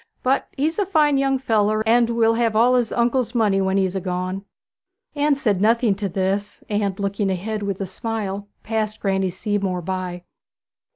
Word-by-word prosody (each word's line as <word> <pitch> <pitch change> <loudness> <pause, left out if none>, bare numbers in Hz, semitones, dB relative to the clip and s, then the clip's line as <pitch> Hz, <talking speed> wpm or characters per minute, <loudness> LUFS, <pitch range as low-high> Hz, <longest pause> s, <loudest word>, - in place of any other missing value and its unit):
'But 260 +2 +1
he's 315 +7 0
a 405 - +2
fine 300 -6 +3
young 270 0 +2
feller, 215 -4 +1
and 235 +1 +4
will 230 -1 +3
have 230 -1 +1
all 240 +3 +5
his 245 -3 +1
uncle's 240 0 0
money 205 -4 +3
when 190 0 +1
'a's 190 -1 +1
gone.' 185 +2 -3 0.7
Anne 290 0 +2
said 210 -8 0
nothing 230 0 +3
to 200 0 -3
this, 195 +3 -2
and 205 -2 -1
looking 200 0 -1
ahead 210 +4 -2
with 200 -2 -3
a 195 - -2
smile 200 0 -4 0.2
passed 215 -1 -2
Granny 190 -1 0
Seamore 190 -1 -2
by. 185 -1 -4
210 Hz, 170 wpm, -22 LUFS, 195-235 Hz, 0.7 s, all